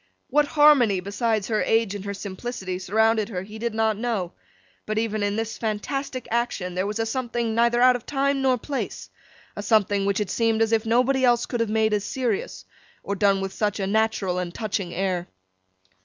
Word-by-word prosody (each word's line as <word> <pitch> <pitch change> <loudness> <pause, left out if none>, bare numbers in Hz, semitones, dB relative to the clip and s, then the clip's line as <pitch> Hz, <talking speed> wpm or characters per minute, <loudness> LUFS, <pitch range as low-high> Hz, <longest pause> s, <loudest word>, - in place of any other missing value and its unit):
What 295 +2 +3
harmony, 285 -10 +5
besides 205 +2 -1
her 215 -1 +1
age 225 -3 +1
and 200 -2 -6
her 200 - -3
simplicity, 190 -1 -5
surrounded 220 +3 +2
her, 185 -4 -4
he 215 +3 -10
did 230 -1 -2
not 220 -1 +1
know, 220 -7 -2 0.6
but 215 0 -2
even 215 -1 -1
in 205 0 0
this 225 0 -3
fantastic 250 +4 -3
action 230 -6 -1
there 185 +2 -1
was 210 +1 -3
a 225 - 0
something 235 -1 -2
neither 235 +1 +3
out 250 0 +6
of 245 - -7
time 275 -1 0
nor 260 -1 +3
place: 275 +3 -5 0.4
a - - -4
something 205 -1 +2
which 200 0 +1
it 205 -3 -2
seemed 225 -1 +1
as 225 - -1
if 225 0 +1
nobody 255 +3 +2
else 240 -1 +3
could 240 - -3
have 230 -2 0
made 220 0 +2
as 205 -1 +1
serious, 265 - -3 0.4
or 200 - -2
done 195 -1 +2
with 195 0 -4
such 210 -1 -1
a 195 - -1
natural 200 -3 0
and 175 -1 -5
touching 205 -5 -3
air. 180 -1 -2
220 Hz, 200 wpm, -24 LUFS, 200-240 Hz, 0.6 s, out